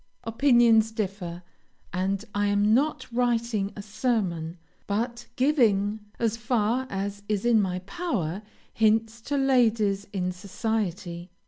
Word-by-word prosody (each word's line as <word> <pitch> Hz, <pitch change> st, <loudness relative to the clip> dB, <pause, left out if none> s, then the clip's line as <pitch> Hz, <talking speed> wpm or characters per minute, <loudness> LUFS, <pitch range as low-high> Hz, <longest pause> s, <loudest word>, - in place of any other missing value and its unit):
Opinions 230 Hz, -2 st, +4 dB
differ, 190 Hz, -5 st, -4 dB, 0.5 s
and 195 Hz, +3 st, -1 dB
I 205 Hz, 0 st, +1 dB
am 205 Hz, +1 st, +3 dB
not 290 Hz, +6 st, +1 dB
writing 235 Hz, -4 st, 0 dB
a 205 Hz, -, -7 dB
sermon, 200 Hz, -7 st, -1 dB, 0.3 s
but 235 Hz, +4 st, -2 dB
giving, 220 Hz, -7 st, +2 dB, 0.2 s
as 230 Hz, -1 st, 0 dB
far 235 Hz, +2 st, 0 dB
as 200 Hz, +1 st, -4 dB
is 210 Hz, 0 st, 0 dB
in 230 Hz, -3 st, +5 dB
my 185 Hz, -2 st, -1 dB
power, 210 Hz, -, -2 dB, 0.3 s
hints 220 Hz, +1 st, +2 dB
to 285 Hz, +5 st, -2 dB
ladies 225 Hz, -7 st, +2 dB
in 185 Hz, -2 st, -1 dB
society. 185 Hz, -3 st, -3 dB
215 Hz, 120 wpm, -26 LUFS, 195-235 Hz, 0.5 s, in